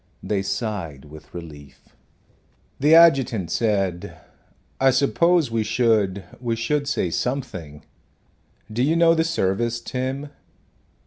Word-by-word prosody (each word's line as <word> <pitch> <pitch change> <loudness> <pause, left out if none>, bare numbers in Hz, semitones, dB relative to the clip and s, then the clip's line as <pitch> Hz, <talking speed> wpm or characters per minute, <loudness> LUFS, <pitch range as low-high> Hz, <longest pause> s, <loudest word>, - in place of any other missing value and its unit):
They 100 -2 -1
sighed 95 - -4
with 75 +1 -14
relief. 75 -5 -11 0.9
The 150 +4 +5
adjutant 135 - +4
said, 100 -6 -1 0.6
"I 135 - +5
suppose 145 +3 +2
we 115 -1 0
should 105 -4 +1 0.2
we 120 -2 -2
should 140 +5 -1
say 90 -10 -1
something. 90 - -4 0.9
Do 120 - -1
you 150 +5 +2
know 170 0 +5
the 160 -1 +2
service, 115 - -1
Tim?" 130 +4 -4
115 Hz, 115 wpm, -22 LUFS, 95-140 Hz, 0.9 s, The